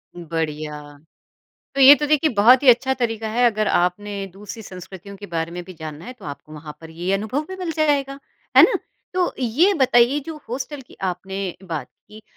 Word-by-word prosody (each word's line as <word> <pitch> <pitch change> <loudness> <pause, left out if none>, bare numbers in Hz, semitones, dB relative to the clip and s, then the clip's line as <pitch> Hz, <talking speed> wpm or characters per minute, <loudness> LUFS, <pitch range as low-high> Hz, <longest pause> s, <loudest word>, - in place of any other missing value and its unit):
बढ़िया। 155 -3 -4 0.9
तो 275 - -1
ये 270 +2 +11
तो 295 +1 -2
देखिए 305 +1 +2
बहुत 240 +6 +6
ही 275 - +3
अच्छा 255 +2 +5
तरीका 225 -3 -2
है, 240 +3 +2
अगर 215 -1 -1
आपने 195 +3 0
दूसरी 205 +3 -9
संस्कृतियों 190 +1 -10
के 205 +1 -10
बारे 165 -2 -3
में 175 +1 -6
भी 185 - -10
जानना 155 -1 -8
है, 250 - -7
तो 255 - -17
आपको 145 +1 -9
वहाँ 150 0 -9
पर 160 -1 -11
ये 175 +4 -3
अनुभव 220 +9 -2
भी 375 - -6
मिल 365 -3 -4
जाएगा। 280 -3 +1 0.4
है - - +11
ना? - - +5 0.4
तो 365 -1 +1
ये 270 - +3
बताइए 255 -2 +4
जो 320 -1 -6
हॉस्टल 270 +4 -5
की 250 - -19
आपने 190 0 -4
बात 165 -5 -5 0.2
की, 215 +1 -13
210 Hz, 195 wpm, -22 LUFS, 175-265 Hz, 0.9 s, ये